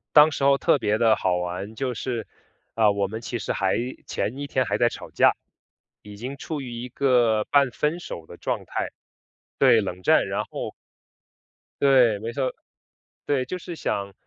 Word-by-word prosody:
当 150 +1 +8
时 140 - -3
候 140 0 +5
特 - - +3
别 105 -1 +1
的 110 -2 +5
好 90 -1 0
玩， 90 +4 -4
就 130 0 -2
是， 115 -2 -4 0.5
呃， 110 -2 +4
我 100 -1 0
们 110 +3 -5
其 120 0 -4
实 - - -3
还 95 -1 +1 0.3
前 125 +6 -3
一 145 - -4
天 130 -2 +1
还 100 - 0
在 120 - +4
吵 - - -6
架， - - +4 0.7
已 105 0 -10
经 130 +5 -6
处 150 +1 -5
于 125 -2 -7
一 120 +1 -5
个 120 -5 +2
半 140 -3 +3
分 155 +7 -1
手 85 - -8
的 85 - -11
状 - - -2
态。 - - -3 0.7
对， 110 - +6
冷 90 -2 -5
战。 - - +4
然 - - -1
后 - - -6 1.1
对， 125 -6 +5
没 115 +3 -4
错 130 +1 -1 0.7
对。 135 -3 +1
就 180 - -4
是 175 -1 -8
想， 100 -9 -3
120 Hz, 200 characters per minute, -24 LUFS, 105-135 Hz, 1.1 s, 当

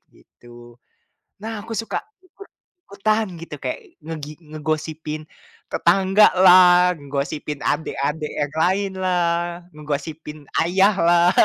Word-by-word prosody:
gitu. 120 0 -17 0.6
Nah 225 +1 -5
aku 230 - -8
suka 225 +2 -2 0.2
ikut-ikutan 225 - -4
gitu, 170 - -8
kayak - - -3 0.3
ngegi 155 -2 -6 0.2
ngegosipin 155 0 -4 0.5
tetanggalah, 185 -1 +5
ngegosipin 145 +1 -4
adek-adek 150 0 -2
yang 145 0 -2
lainlah, 175 -1 0
ngegosipin 150 +1 -6 0.2
ayahlah. 175 -1 +3
170 Hz, 85 wpm, -21 LUFS, 150-190 Hz, 0.6 s, tetanggalah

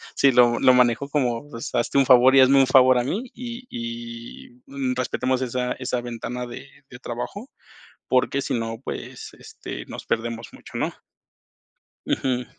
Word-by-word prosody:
sí, 140 -1 +4
lo 120 -1 +5
lo 130 - +6
manejo 125 +2 +2
como: 125 -4 0
“Pues, 115 0 -7
hazte 120 +3 0
un 135 - +5
favor, 130 +1 +6
y - - +8
hazme 135 +1 +6
un 135 - +4
favor 130 -1 +6
a 120 - +1
mí, 200 - -2
y 245 +1 -8
y, 115 0 -7 0.2
mm, 135 -2 -2
respetemos 130 0 -1
esa 125 0 -2
esa 125 -1 -3
ventana 120 +1 -5
de 120 - -9 0.2
de 125 - -12
trabajo”, 125 - -6 0.6
porque 130 +2 +1
si - - -3
no, 115 -1 -3
pues, - - -7
este, - - -8
nos - - -8
perdemos 115 0 -2
mucho, - - -10
¿no? - - -1 1.1
Ujú 125 -2 -1
125 Hz, 165 wpm, -23 LUFS, 120-135 Hz, 1.1 s, y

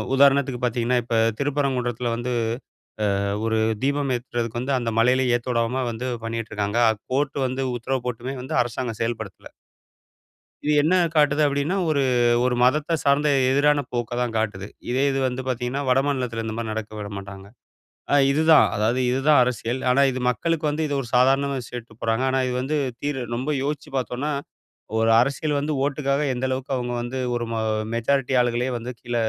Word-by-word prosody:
உதாரணத்துக்கு 135 -2 +3
பாத்தீங்கன்னா, 120 +1 +1
இப்ப 115 0 -2 0.2
திருப்பரங்குன்றத்துல 130 -4 -1
வந்து, 120 +1 -3 0.9
அ - - -1 0.2
ஒரு 110 0 +1 0.3
தீபம் 140 0 0
ஏத்துறதுக்கு 120 -1 -4
வந்து 135 +2 0
அந்த 120 -2 -2
மலையில 130 +3 +3
ஏத்தவிடாம 120 +1 -1
வந்து 115 +2 -5 0.2
பண்ணிக்கிட்டு 115 -1 -4
இருக்காங்க. 105 +2 -1 0.3
கோர்ட் 140 +2 0
வந்து 130 +1 -2
உத்தரவு 130 +1 -3
போட்டுமே 125 +2 -4
வந்து 130 - -6
அரசாங்கம் 120 -1 -5
செயல்படுத்தல. 110 -3 -4 1.2
இது 150 - +2
என்ன 160 +4 +2 0.2
காட்டுது 150 -1 +3
அப்படின்னா 140 +5 0
ஒரு 145 -3 +2 0.4
ஒரு 125 -1 +1
மதத்த 150 +6 +2
சார்ந்த 145 +1 +3 0.2
எதிரான 145 +1 +3
போக்க 120 -1 -2
தான் 120 -2 -1
காட்டுது. 105 -3 -2 0.2
இதே 130 +3 +1
இது 135 - -1
வந்து 130 +1 -3
பார்த்தீங்கன்னா 125 +2 -2
வடமாநிலத்தில 130 -3 0
இந்த 110 - -3
மாரி 115 -2 -3
நடக்க 110 0 -5
விடமாட்டாங்க. 100 -1 -7 0.7
அ - - +5 0.2
இதுதான் 155 +2 +5
அதாவது 110 +5 +1
இதுதான் 135 +2 +4
அரசியல். 125 0 -1
ஆனா 130 +2 +4
இது 130 - -4
மக்களுக்கு 165 +6 -1
வந்து 155 +2 -1
இது 145 - -2
ஒரு 125 - -6
சாதாரணமா 135 +2 +3
சொல்லிட்டு 115 -2 -9
போறாங்க. 115 +3 0
ஆனா 130 0 +1
இது 125 - -2
வந்து 150 +3 -1 0.2
தீர் 145 -2 -2 0.2
ரொம்ப 130 +5 -2
யோசிச்சு 145 0 -4
பார்த்தோம்னா! 130 +3 -2 0.7
ஒரு 115 0 +3
அரசியல் 145 +3 0
வந்து 150 +2 -2
ஓட்டுக்காக 140 0 0
எந்த 125 +1 -2
அளவுக்கு 130 +1 -3
அவுங்க 125 -1 -3
வந்து 120 +2 -4 0.2
ஒரு 120 0 -2
மொ 115 - -1 0.4
மெஜாரிட்டி 135 +3 0
ஆள்களே 120 +1 0
வந்து 120 +2 -6
கீழ 120 0 -5
125 Hz, 160 wpm, -23 LUFS, 120-140 Hz, 1.2 s, அ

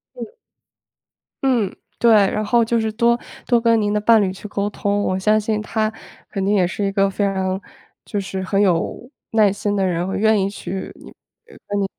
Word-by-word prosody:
嗯。 - - -7 1.1
嗯， 240 -8 +1 0.3
对， 235 - +5
然 210 0 +3
后 230 +2 +3
就 230 0 +1
是 220 0 -1
多 235 +2 +2 0.3
多 240 -2 +3
跟 230 -1 +3
您 205 0 0
的 210 - 0
伴 225 0 +5
侣 190 -2 0
去 195 +2 -9
沟 200 0 -1
通， 205 0 -1
我 185 - 0
相 215 +3 +3
信 215 0 -1
他 215 0 -1 0.4
肯 195 -2 -3
定 200 - +2
也 185 -4 +3
是 200 +3 -3
一 195 - 0
个 195 0 +2
非 200 +1 -2
常 190 -1 -1 0.4
就 205 - -3
是 190 -1 -4
很 195 +1 +1
有 195 +5 0 0.2
耐 215 -3 +4
心 205 +1 -2
的 195 -1 +1
人， 175 -1 -1
或 190 - -4
者 - - -2
愿 220 0 +3
意 195 - 0
去 195 -1 -6
你 - - -14 0.3
跟 205 - -6
你 200 - +1
205 Hz, 225 characters per minute, -20 LUFS, 195-220 Hz, 1.1 s, 对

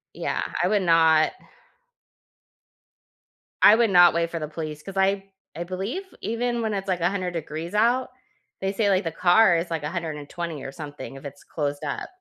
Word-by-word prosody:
Yeah, - - -2 0.2
I 180 - +2
would 205 0 +2
not 160 -2 +4 2.3
I 210 - +9
would 230 -1 +3
not 175 -2 +7
wait 170 0 0
for 165 - -3
the 155 - -4
police 155 -1 -6
'cause 195 +2 -8
I 195 0 +2 0.3
I 170 +2 -4
believe 195 - -4 0.2
even 240 +1 -1
when 220 -1 -1
it's, 195 -1 -3
like, 180 -2 -1
100 180 +1 0
degrees 165 +1 -5
out, 240 +5 +2 0.5
they 195 0 0
say, 205 +1 +1
like, 190 0 +2
the 165 - -3
car 180 +2 +4
is, 170 +1 -3
like, 165 -3 -3
120 155 -1 -5
or 135 - -6
something, 145 -2 -8
if 135 - -11
it's 140 0 -9
closed 145 -1 -4
up. 145 - -4
175 Hz, 175 wpm, -24 LUFS, 155-195 Hz, 2.3 s, I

